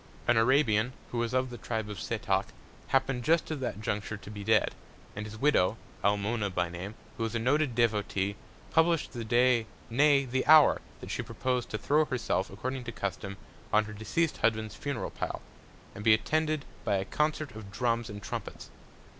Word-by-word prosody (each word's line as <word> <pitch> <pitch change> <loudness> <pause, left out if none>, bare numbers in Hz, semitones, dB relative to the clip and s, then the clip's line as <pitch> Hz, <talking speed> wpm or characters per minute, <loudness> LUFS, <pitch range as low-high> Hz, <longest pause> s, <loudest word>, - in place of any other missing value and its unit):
An 120 - +5
Arabian, 120 -1 +3 0.2
who 120 - -2
was 115 -1 0
of 130 0 0
the 120 - -8
Tribe 110 +2 -3
of 105 -4 -6
Setoc, - - 0 0.4
happen'd 135 -2 +1
just 160 +5 +2
at 155 - -2
that 120 -4 -4
Juncture, 105 +1 -2
to 105 - -11
be 105 -1 -7
dead, 110 +1 +3 0.4
and 105 +1 -4
his 110 +1 -9
Widow 115 -6 +3 0.3
(Almona 105 +1 +1
by 90 -2 -1
Name) 90 +5 -6 0.2
who 115 - -2
was 115 +1 -2
a - - +3
noted 130 +2 +1
Devotee, 105 -4 +1 0.4
publish'd 165 0 +3
the 120 -2 -4
Day, 120 0 +3 0.2
nay, 140 +2 +4
the 130 +1 0
Hour, 155 -1 +7 0.2
that - - -7
she - - -1
propos'd 125 -1 -2
to 110 - -2
throw 150 +8 +3
herself 125 -8 -1
(according 130 +7 -4
to 120 - -4
Custom) 95 -1 -4 0.3
on 110 +1 +4
her 105 - -8
deceased 130 +10 -1
Husband's 110 -1 +1
Funeral 140 -1 -4
Pile, - - -4 0.5
and 100 - -8
be 110 -1 +7
attended 155 +4 0 0.2
by 100 - +1
a 95 0 0
Concert 150 +2 -1
of 105 -3 -9
Drums 115 +1 0
and 105 0 -8
Trumpets. - - -6
115 Hz, 185 wpm, -30 LUFS, 105-130 Hz, 0.5 s, Hour